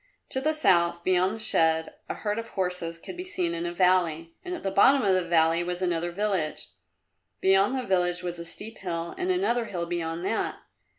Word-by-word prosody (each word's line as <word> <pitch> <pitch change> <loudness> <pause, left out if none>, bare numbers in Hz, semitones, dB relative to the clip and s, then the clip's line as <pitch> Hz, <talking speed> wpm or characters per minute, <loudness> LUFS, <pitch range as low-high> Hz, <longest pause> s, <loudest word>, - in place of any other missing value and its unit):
To 265 - 0
the 310 +3 +2
south, 170 - +2
beyond 185 +2 +2
the - - -9
shed, 160 -6 +2 0.2
a - - -2
herd 210 +1 -2
of 230 - -6
horses 180 -4 -3
could 165 - -9
be 360 - -5
seen 180 - -2
in 170 +1 -3
a - - -3
valley, 175 -3 +1
and 360 -1 -4
at - - -9
the 195 - -1
bottom 265 +7 +5
of 195 - +3
the 185 - +3
valley 165 0 +3
was 180 +1 -3
another 175 -1 0
village. 190 -5 -2 0.7
Beyond 195 +6 +3
the 255 - -2
village 180 -3 0
was 175 -1 -4
a 170 - -6
steep 215 +6 -5
hill 170 -2 -4
and 370 0 -2
another 360 -11 +1
hill 175 -5 -4
beyond 170 0 -3
that. 220 +3 -1
180 Hz, 210 wpm, -27 LUFS, 170-210 Hz, 0.7 s, bottom